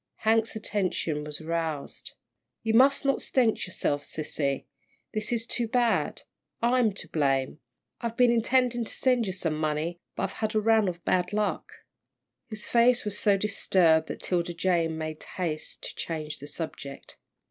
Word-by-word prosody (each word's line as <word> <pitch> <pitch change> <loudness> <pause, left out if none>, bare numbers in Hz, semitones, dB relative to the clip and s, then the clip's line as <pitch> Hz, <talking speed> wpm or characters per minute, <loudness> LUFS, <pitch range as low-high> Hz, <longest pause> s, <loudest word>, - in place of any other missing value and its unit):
Hank's 225 +1 +3
attention 185 -8 -1
was 150 0 -5
aroused. 160 -2 -3 0.5
"You 225 -1 +1
must 275 +4 +5
not 275 - +2
stent 235 -6 +2
yourself, 145 -5 -1
sissy. 145 -2 -3 0.5
This 215 +1 -2
is 230 -1 0
too 240 -1 0
bad. 235 -1 +1 0.4
I'm 240 -1 +3
to - - -7
blame. 135 -1 0 0.4
I've 235 -1 -3
been 245 -1 +6
intending 240 +1 +2
to - - -4
send 250 -4 +2
you - - -1
some 175 -4 -1
money, 155 +2 -1 0.2
but - - -2
I've - - -2
had 220 0 -2
a - - +5
run 220 -1 +4
of 175 -1 -4
bad 180 +1 +1
luck." 210 -1 -1 0.8
His 215 -2 -4
face 240 0 +4
was 205 -1 -1
so 200 -2 +4
disturbed 180 -5 +3
that - - -6
'Tilda 175 -1 -1
Jane 170 -2 +1
made 155 -1 -5
haste 165 -4 -4
to - - -5
change 155 -2 -4
the 145 - -9
subject. 145 -3 -7
190 Hz, 160 wpm, -28 LUFS, 160-230 Hz, 0.8 s, been